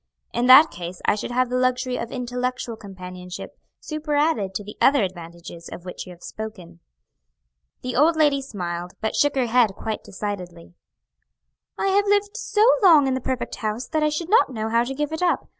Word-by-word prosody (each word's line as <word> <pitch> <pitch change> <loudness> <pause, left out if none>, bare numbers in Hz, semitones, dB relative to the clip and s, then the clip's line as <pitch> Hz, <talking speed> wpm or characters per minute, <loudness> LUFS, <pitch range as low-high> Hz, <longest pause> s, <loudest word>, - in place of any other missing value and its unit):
"In 240 +1 0
that 275 +5 +9
case 175 +1 -7
I - - +4
should 210 - -4
have 250 0 0
the 250 - +1
luxury 255 0 0
of 230 - -5
intellectual 250 -1 -3
companionship 180 -3 -9 0.2
superadded 295 -9 -1
to 205 - -3
the 205 - -10
other 275 -4 +5
advantages 170 -2 -8
of 175 - -9
which 180 - -7
you - - -9
have 175 0 -14
spoken." 185 -6 -8 1.0
The 250 -1 -3
old 315 +5 +4
lady 295 -3 +3
smiled, 180 -8 -5
but 220 - -2
shook 290 -1 +2
her 260 -2 +2
head 230 -4 +3
quite 220 -1 -4
decidedly. 180 -4 -7 1.0
"I 390 - 0
have 405 +1 +2
lived 405 0 +1
so 425 0 +1 0.2
long 325 -8 +7
in 265 - +1
the 260 - -2
perfect 260 0 -3
house 215 +3 -3
that 315 -1 0
I 305 - +3
should 320 +4 -4
not 445 - +5
know 220 -2 -3
how 230 +1 +3
to 270 +2 -5
give 295 +1 -2
it 320 - -4
up. 360 -1 +1
245 Hz, 190 wpm, -23 LUFS, 190-290 Hz, 1.0 s, that